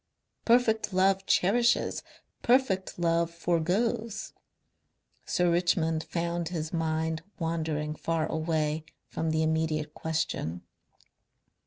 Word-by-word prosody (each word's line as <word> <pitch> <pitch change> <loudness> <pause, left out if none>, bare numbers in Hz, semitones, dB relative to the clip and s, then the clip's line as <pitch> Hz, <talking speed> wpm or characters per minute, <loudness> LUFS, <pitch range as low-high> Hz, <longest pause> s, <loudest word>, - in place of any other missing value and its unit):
"Perfect 225 -3 +3
love 195 +1 +2
cherishes. 235 +6 +2 0.4
Perfect 235 -7 +2
love 170 -1 +2
foregoes." 195 +7 -1 0.9
Sir 175 -1 +2
Richmond 165 -2 +1
found 170 0 -2
his 160 -2 -4
mind 160 0 -1 0.2
wandering 160 -3 -2
far 160 0 -1
away 155 -1 -1 0.2
from 160 - -3
the 160 0 +1
immediate 155 -1 0
question. 155 - -2
165 Hz, 95 wpm, -29 LUFS, 160-190 Hz, 0.9 s, Perfect